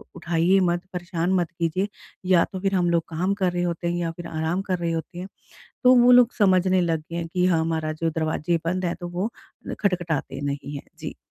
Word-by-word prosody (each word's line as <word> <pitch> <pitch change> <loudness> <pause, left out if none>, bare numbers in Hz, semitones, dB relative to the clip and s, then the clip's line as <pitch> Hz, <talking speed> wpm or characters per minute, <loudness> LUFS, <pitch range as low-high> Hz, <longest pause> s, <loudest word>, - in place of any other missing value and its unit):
उठाइए 175 +2 +2
मत, 175 0 0
परेशान 175 0 -2
मत 175 -3 +1
कीजिए 170 +3 -1 0.4
या 180 -3 +6
तो 190 - -3
फिर 195 0 0
हम 175 -2 +2
लोग 170 -1 +2
काम 180 +5 0
कर 185 -1 +3
रहे 175 0 -1
होते 170 0 -2
हैं 175 - 0
या 170 -1 -1
फिर 170 +1 -8
आराम 160 +4 -1
कर 185 - +2
रहे 170 -1 -1
होते 165 +2 -4
हैं। 185 - -6 0.6
तो 255 0 +7
वो 245 - +7
लोग 245 -1 +6
समझने 185 -2 +4
लग 165 -2 +1
गए - - -4
हैं 170 -1 -3
कि 180 0 +2
हाँ, 170 -3 +3
हमारा 160 -1 -1
जो 165 +1 -1
दरवाजे 160 +1 -1
बंद 180 +2 -1
है, 170 - -1
तो 175 - -7
वो 180 +5 -2 0.5
खटखटाते 170 -7 -1
नहीं 145 0 -4
हैं। - - -11
जी। - - -6
175 Hz, 225 wpm, -24 LUFS, 165-185 Hz, 0.6 s, तो